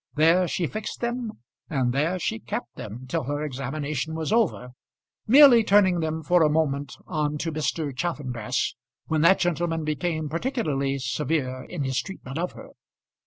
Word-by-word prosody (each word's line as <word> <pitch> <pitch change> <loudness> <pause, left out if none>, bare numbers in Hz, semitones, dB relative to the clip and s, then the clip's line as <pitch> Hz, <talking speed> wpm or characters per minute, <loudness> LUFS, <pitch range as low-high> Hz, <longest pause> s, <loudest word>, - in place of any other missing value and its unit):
There 165 +4 +4
she 175 - -1
fixed 215 +6 -5
them, 240 -2 -2 0.4
and 130 -4 0
there 155 +7 +1
she 110 -10 -2
kept 115 +1 -5
them 115 +5 -8
till 130 - -2
her 145 +2 -2
examination 145 +2 -3
was 160 +3 -3
over, 210 - +1 0.6
merely 255 -1 +8
turning 190 -4 +4
them 160 0 -2
for 175 +3 +3
a 155 - +5
moment 145 -3 0
on 150 -3 -1
to 165 +2 -2
Mr. 150 -2 -2
Chaffanbrass, 130 -7 -2 0.3
when 155 -1 0
that 170 +4 +6
gentleman 170 -2 0
became 155 +1 -2
particularly 155 - -1
severe 130 -1 -2
in 145 - -4
his 130 -1 0
treatment 160 -7 -7
of 180 +1 -2
her. - - -11
155 Hz, 160 wpm, -25 LUFS, 140-175 Hz, 0.6 s, merely